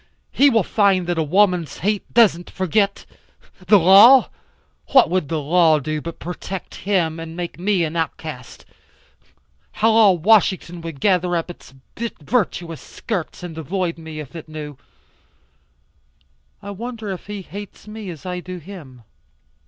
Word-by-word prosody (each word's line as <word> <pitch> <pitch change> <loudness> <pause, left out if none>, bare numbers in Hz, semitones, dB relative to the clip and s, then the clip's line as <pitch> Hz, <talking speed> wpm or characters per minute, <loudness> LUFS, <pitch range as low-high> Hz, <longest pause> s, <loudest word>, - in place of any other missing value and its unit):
He 285 +1 +5
will 225 -6 +2
find 195 -2 +2
that 175 -1 -1
a - - +2
woman's 180 -2 +1
hate 205 +2 -2
doesn't 200 -7 +3
forget. 200 +2 -1 0.6
The 205 - +7
law? 200 +9 +7 0.6
What 260 -11 +6
would 180 -6 0
the 160 - -1
law 160 +1 +3
do 155 +1 -3
but 170 +1 -7
protect 180 +2 -7
him 175 -5 -1
and 165 0 -8
make 175 -1 -6
me 190 -1 +1
an 160 0 -3
outcast? 155 -5 -5 1.1
How 225 +1 +2
all 215 -5 +5
Washington 185 -2 +2
would 165 -5 -8
gather 180 -3 +2
up 170 +1 -2
its 135 - -16 0.4
virtuous 170 - -2
skirts 185 -5 -6
and 170 -3 -7
avoid 170 +1 -3
me, 160 -1 -8
if 150 +2 -9
it 160 -1 -9
knew. 150 -2 -7 1.9
I 200 - -6
wonder 225 0 -6
if 185 - -8
he 205 -2 -6
hates 205 +2 -10
me 210 -2 -8
as 165 0 -10
I 180 -1 -4
do 180 +1 -8
him?" 155 -9 -12
180 Hz, 150 wpm, -20 LUFS, 160-200 Hz, 1.9 s, The